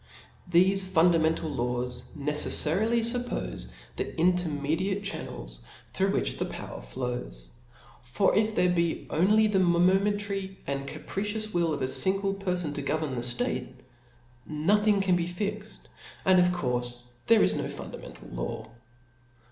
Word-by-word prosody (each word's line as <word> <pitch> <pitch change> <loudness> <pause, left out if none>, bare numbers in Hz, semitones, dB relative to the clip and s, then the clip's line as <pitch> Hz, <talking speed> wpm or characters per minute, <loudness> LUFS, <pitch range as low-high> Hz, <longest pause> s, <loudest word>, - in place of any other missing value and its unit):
Thefe 185 +3 +5
fundamental 165 -1 +3
laws 125 -2 -2
negeJTarily. 160 +9 +2
fuppofe 245 +2 -2 0.3
the - - -4
intermediate 180 +2 +1
channels - - -6 0.3
through - - +1
W'high - - -1
the - - 0
power - - -7
flows: 60 - -5 0.6
for 125 +11 +1
if 215 0 +2
there 180 0 +3
be 170 -2 0
only 210 +7 +4
the 210 -3 +2
momentary 190 +2 +2
and 140 0 -3
capricious 210 +8 -4
will 170 -2 +2
of 145 -3 -2
a - - +1
fin 190 +8 +3
ale 195 0 +1
perfon 180 -5 -2
to 145 - -4
govern 155 0 -1
the 120 - -2
ftate, 125 +1 -1 0.8
nothing 200 - +2
can 185 -2 +3
be 170 -1 0
fixed, 205 +3 -5 0.4
and 185 -1 +6
of 180 - +5
courfe 125 -7 -2 0.3
there 225 -2 +6
is - - +4
no 145 -2 -2
fundamental - - -9
law. 110 - -5
175 Hz, 135 wpm, -28 LUFS, 140-195 Hz, 0.8 s, and